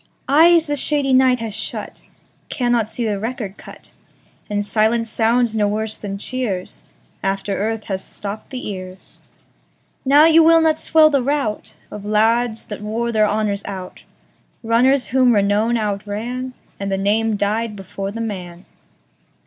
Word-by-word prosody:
Eyes 325 +4 +5
the 290 -2 -1
shady 285 -1 +1
night 255 -1 +4
has 225 -2 -4
shutCannot 240 +1 -4
see 235 +1 -3
the 205 -2 -1
record 225 -3 -5
cut, - - -13 0.6
And 205 0 -1
silence 225 +2 +1
sounds 230 0 +1
no 210 -1 +2
worse 215 +1 -2
than 200 -1 -5
cheersAfter 205 -5 -4 0.7
earth 215 +3 -2
has 190 -1 -4
stopped 205 +1 -7
the 255 -2 -6
ears:Now 195 +8 -2
you 325 0 +6
will 330 +1 +6
not 320 -1 +2
swell 315 -1 +4
the 280 -2 +2
routOf 270 -5 -2 0.3
lads 220 +2 +1
that 210 -1 -7
wore 230 +3 -2
their 215 -2 +3
honours 210 -1 -1
out, 190 -2 -7 0.6
Runners 250 +4 +2
whom 250 -1 +3
renown 205 +3 +2
outranAnd 220 +4 -3 0.3
the 195 -1 -2
name 215 +3 +1
died 210 +2 -1
before 195 0 -6
the 230 +3 -5
man. 180 -5 -6
220 Hz, 135 wpm, -20 LUFS, 205-255 Hz, 0.7 s, you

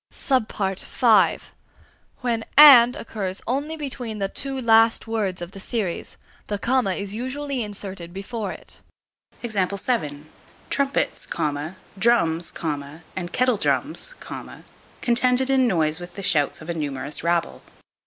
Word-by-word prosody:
(e) 215 -2 +2 0.8
When 235 -3 -1
"and" 255 -5 +10
occurs 205 -8 -5
only 285 +6 -2
between 250 -7 -5
the 195 -1 -1
two 270 +3 -4
last 225 -1 +4
words 205 -6 -2
of 175 - -8
the 195 - -10
series, 200 -4 -3 0.3
the 205 - -2
comma 235 -2 +1
is 200 0 -5
usually 260 +3 -3
inserted 195 -5 -6
before 200 +2 -5
it. - - -12 1.9
Trumpets, 280 0 0 0.7
drums, 175 -7 +2 0.6
and 175 -2 -4
kettle 250 -3 +2
drums, - - -1 0.9
contended 250 +2 +2
in 260 -2 +4
noise 160 -5 +2
with 175 0 -9
the 200 - -6
shouts 155 -7 +2
of 160 - -11
a - - -2
numerous 145 -2 -4
rabble. 170 0 0
220 Hz, 115 wpm, -23 LUFS, 185-255 Hz, 1.9 s, and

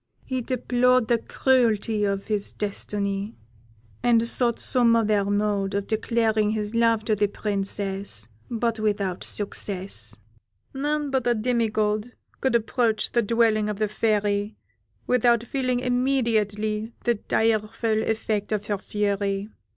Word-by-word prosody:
He 260 -1 -2
deplored 250 -1 +2
the 235 -1 +3
cruelty 225 -5 +1
of 200 0 -1
his 210 -2 -1
destiny, 200 0 -3 0.7
and 230 -1 +3
sought 235 -1 +1
some 240 -2 +3
other 215 -3 +2
mode 205 -1 0
of 200 0 -1
declaring 220 -1 +1
his 210 0 -2
love 230 -1 +2
to 215 - +2
the 205 0 +2
Princess, 195 - -2 0.2
but 230 -1 -1
without 200 -4 -1
success. 200 -2 -2 0.6
"None 290 +1 -1
but 260 -2 0
a 240 - +3
demi 230 0 +1
god 215 +2 -1 0.3
could 265 -2 +1
approach 225 -1 +1
the 235 - +3
dwelling 220 -1 +2
of 210 - -3
the 215 0 +1
Fairy 210 -1 0 0.5
without 240 -2 +3
feeling 255 0 -1
immediately 225 -4 0
the 240 - +3
direful 220 0 0
effect 220 -2 -1
of 210 -1 -1
her 205 -2 -2
fury. 200 0 -1
215 Hz, 130 wpm, -25 LUFS, 205-235 Hz, 0.7 s, the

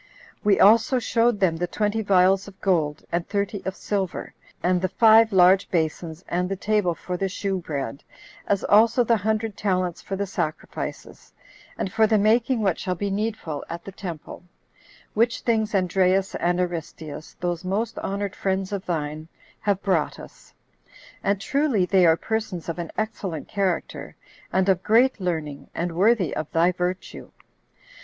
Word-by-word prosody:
We 205 -2 +3
also 225 +5 +5
showed 235 -2 +1
them 175 -4 +2
the 175 +1 -1
twenty 210 +4 -1
vials 190 -1 +3
of 195 -1 -13
gold, 160 -6 0
and 170 0 -2
thirty 200 -1 -2
of 190 - -3
silver, 195 -4 -3 0.3
and 180 0 +2
the 185 - +1
five 225 +1 +6
large 190 +1 +5
basons, 160 0 -2
and 180 +1 -1
the 195 - -1
table 200 -3 0
for 180 +2 -5
the 195 +1 -1
shew 195 0 -2
bread; 140 -6 -5 0.4
as 200 -1 +1
also 230 +4 +5
the 230 0 +3
hundred 220 +1 -1
talents 185 -4 -1
for 195 - -5
the 200 +1 -2
sacrifices, 170 -5 -5 0.5
and 185 - -3
for 220 0 +4
the 215 0 +3
making 225 +3 +2
what 190 -4 +1
shall 185 - -2
be 200 +2 -3
needful 200 -8 -3
at 170 0 -6
the 195 - -7
temple; 175 -5 -8 0.7
which 230 +2 +1
things 220 -3 0
Andreas 185 +1 +2
and 175 +1 0
Aristeus, 165 -3 -5
those 175 0 -2
most 210 +5 -2
honored 200 0 -3
friends 190 0 -1
of 200 -2 -4
thine, 155 -2 -3 0.3
have 200 -2 -1
brought 180 -7 0
us; - - -14 0.7
and 200 0 +1
truly 275 -5 +1
they 185 -1 +4
are 160 0 +5
persons 220 -6 -3
of 165 +1 -4
an 170 - -4
excellent 205 -7 -3
character, 190 -4 -2 0.4
and 190 +1 +2
of 185 -2 +3
great 230 +3 +3
learning, 160 -6 -3
and 175 +1 -2
worthy 190 0 +2
of 155 - -4
thy 170 +2 +3
virtue. 180 +1 -4
190 Hz, 165 wpm, -24 LUFS, 175-210 Hz, 0.7 s, five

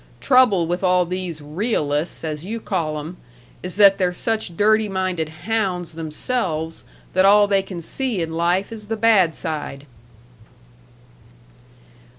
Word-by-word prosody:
Trouble 250 -10 +4
with 175 +3 -3
all 180 -1 +3
these 180 -3 -5
'realists' 155 -2 -2
as 155 -1 -4
you 225 +5 -4
call 165 -8 -2
'em, 160 +4 -7 0.4
is 180 0 -5
that 200 -1 +6
they're 180 -1 +2
such 205 -2 -2
dirty 215 0 +3
minded 185 -4 -2 0.2
hounds 195 -6 -1
themselves 160 0 -3 0.3
that 185 - +3
all 205 +1 +6
they 200 -1 +2
can 190 -2 -8
see 240 +5 -2
in 165 -1 -3
life 175 +5 0
is 215 -2 -9
the 225 +1 -3
bad 210 -7 +4
side." 150 -4 -5
185 Hz, 140 wpm, -21 LUFS, 165-210 Hz, 0.4 s, that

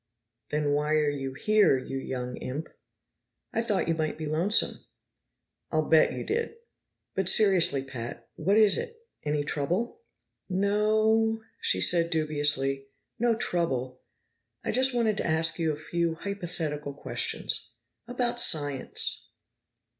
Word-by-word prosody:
"Then 150 -1 0
why 150 +1 +1
are 150 -1 +2
you 135 -2 -5
here, 210 -2 +3
you 135 +1 -5
young 125 -2 -5
imp?" 145 +5 -5 0.9
"Thought 225 -6 0
you 165 - +2
might 155 -1 -2
be 155 - -5
lonesome." 165 +8 +1 0.9
"I'll - - 0
bet - - +4
you - - -5
did! 460 +2 -2 0.6
But 190 -1 +2
seriously, 180 -10 +4
Pat, 120 -3 -8
what 195 +7 +1
is 215 -3 +5
it? 455 0 -7 0.2
Any 150 0 -1
trouble?" 175 - -2 0.5
"No 210 +3 +1
o," 220 0 +2 0.2
she - - +2
said 170 -1 +5
dubiously. 145 -4 0 0.3
"No 235 0 +2
trouble. 130 - -1 0.6
I - - -1
just 260 +3 +3
wanted 230 -4 +1
to - - -1
ask 160 +1 +2
you 160 -1 +1
a - - -3
few 170 +2 -2
hypothetical 160 -7 -4
questions. - - -2 0.3
About 245 -1 0
science." 145 - +2
165 Hz, 130 wpm, -27 LUFS, 145-210 Hz, 0.9 s, is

